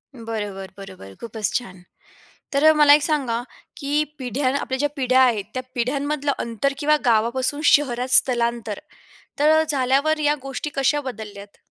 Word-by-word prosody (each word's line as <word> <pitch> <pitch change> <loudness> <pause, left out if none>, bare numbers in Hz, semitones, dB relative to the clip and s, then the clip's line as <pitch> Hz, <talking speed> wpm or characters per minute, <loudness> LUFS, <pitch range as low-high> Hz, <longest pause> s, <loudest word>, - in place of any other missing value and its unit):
बरोबर, 205 -4 -6
बरोबर. 190 - -11
खूपच 220 -2 -4
छान! 190 -7 -4 0.7
तर 310 +3 +5
मला 295 -1 +7
एक 300 - +5
सांगा, 270 -7 -1 0.4
की 290 +1 0 0.2
पिढ्या 255 +2 -1
आपल्या 260 - -3
ज्या 290 +1 +1
पिढ्या 260 -2 +2
आहेत, 230 -6 +2
त्या 255 - -4
पिढ्यांमधलं 285 +4 -1
अंतर 235 +4 -2
किंवा 300 +1 +2
गावापासून 245 +5 +1
शहरात 255 -3 +1
स्थलांतर 235 -4 0 0.6
तर 310 +2 +4
झाल्यावर 280 +3 +1
या 295 0 +3
गोष्टी 270 +2 -5
कशा 275 +2 +1
बदलल्यात? 210 -6 -9
255 Hz, 140 wpm, -22 LUFS, 230-290 Hz, 0.7 s, मला